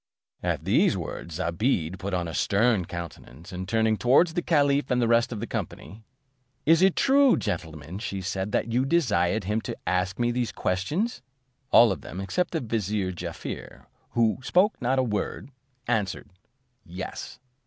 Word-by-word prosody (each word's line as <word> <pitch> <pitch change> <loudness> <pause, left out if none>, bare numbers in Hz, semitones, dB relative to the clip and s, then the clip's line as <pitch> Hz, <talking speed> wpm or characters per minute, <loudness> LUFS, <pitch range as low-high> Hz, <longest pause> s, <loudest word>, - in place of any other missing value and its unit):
At - - -2
these - - +3
words, 85 -2 -6
Zobeide 90 - -1
put 100 - -4
on 90 -2 -1
a 80 - -6
stern 105 0 +2
countenance, 85 -3 -8
and 95 +1 -6
turning 110 0 +2
towards 140 +9 +4
the 175 - 0
caliph 145 -4 +2
and 125 - +2
the 120 - +2
rest 115 +1 +3
of 110 - -4
the 115 - -3
company, 110 -1 -6 0.6
"Is 165 +2 +5
it 190 -1 +5
true, 275 -1 +5
gentlemen," 80 +1 -4
said 95 -4 -4
she, 95 -1 -1
"that 115 +2 -1
you 125 +2 +3
desired 110 - +2
him 105 +4 -1
to - - -5
ask 90 +1 0
me 120 0 +1
these 120 -1 -1
questions?" 150 - -1 0.5
All 115 -2 +7
of 95 - -4
them, 90 - -8
except 100 - -1
the 165 - -2
vizier 105 -4 -1
Jaaffier, 90 - -7 0.3
who 115 -1 +2
spoke 185 +10 +3
not 125 +2 +1
a 130 - +3
word, 110 +3 -3 0.4
answered, 105 -6 -1 0.5
"Yes." 90 +2 -7
110 Hz, 165 wpm, -26 LUFS, 95-125 Hz, 0.6 s, All